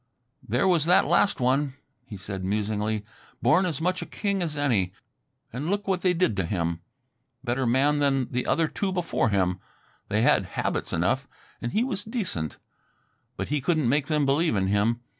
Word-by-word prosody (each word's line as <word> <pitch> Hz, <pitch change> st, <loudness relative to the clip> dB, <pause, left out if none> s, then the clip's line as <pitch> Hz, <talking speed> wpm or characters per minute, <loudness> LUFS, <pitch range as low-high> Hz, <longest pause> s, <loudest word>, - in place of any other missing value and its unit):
"There -, -, 0 dB
was 170 Hz, -5 st, +3 dB
that 175 Hz, +2 st, +5 dB
last 200 Hz, -, +3 dB
one," 130 Hz, +2 st, +1 dB, 0.3 s
he 105 Hz, -, -7 dB
said 95 Hz, 0 st, -6 dB
musingly. 105 Hz, +1 st, -1 dB, 0.3 s
"Born 180 Hz, +5 st, +3 dB
as 160 Hz, -6 st, -3 dB
much 180 Hz, +2 st, 0 dB
a -, -, -6 dB
king 200 Hz, -2 st, -2 dB
as 155 Hz, -4 st, -2 dB
any... 110 Hz, -11 st, +1 dB, 0.6 s
and 140 Hz, +7 st, -3 dB
look 205 Hz, +1 st, -1 dB
what 190 Hz, -2 st, 0 dB
they 180 Hz, -1 st, +2 dB
did 170 Hz, -, +2 dB
to 95 Hz, -, 0 dB
him. 85 Hz, -2 st, -2 dB, 0.6 s
Better 125 Hz, 0 st, 0 dB
man 140 Hz, +5 st, +3 dB
than 135 Hz, -3 st, +2 dB
the 125 Hz, 0 st, -1 dB
other 165 Hz, -1 st, +2 dB
two 195 Hz, +4 st, -2 dB
before 175 Hz, -10 st, 0 dB
him... 95 Hz, -2 st, +1 dB, 0.5 s
they -, -, +1 dB
had -, -, +3 dB
'habits' -, -, -1 dB
enough, 100 Hz, +12 st, 0 dB, 0.3 s
and 120 Hz, -, -3 dB
he 220 Hz, -, +2 dB
was 245 Hz, -6 st, -3 dB
decent. 195 Hz, -, -3 dB, 0.8 s
But -, -, -3 dB
he 150 Hz, -1 st, 0 dB
couldn't 155 Hz, -2 st, +1 dB
make 140 Hz, +3 st, +2 dB
them 150 Hz, -2 st, +1 dB
believe 140 Hz, 0 st, +2 dB
in 95 Hz, -1 st, +1 dB
him. 105 Hz, +4 st, +1 dB
135 Hz, 180 wpm, -26 LUFS, 105-170 Hz, 0.8 s, that